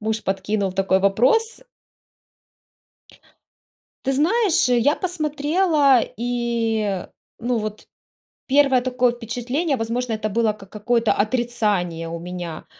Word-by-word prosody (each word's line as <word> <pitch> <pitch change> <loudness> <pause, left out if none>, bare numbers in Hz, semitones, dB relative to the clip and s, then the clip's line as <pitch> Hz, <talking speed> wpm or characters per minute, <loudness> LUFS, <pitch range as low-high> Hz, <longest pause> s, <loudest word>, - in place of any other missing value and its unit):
муж 220 0 -2
подкинул 195 0 -1
такой 190 0 +2
вопрос 255 - +2 2.4
Ты 270 - 0
знаешь, 355 - +2
э, 245 - +3
я 285 +6 +3
посмотрела 305 -4 +2 0.2
и, 230 -5 -1 0.3
ну, 240 +1 -1
вот 215 -1 -5 0.6
первое 275 -2 +4
такое 250 -1 +1
впечатление, 245 +6 -2
возможно, 230 +1 -2
это 215 0 -2
было 220 0 +1
как 195 -2 -15
какое-то 225 +1 +1
отрицание 205 -8 -1
у 170 - -5
меня, 175 -2 -7
235 Hz, 110 wpm, -22 LUFS, 210-270 Hz, 2.4 s, первое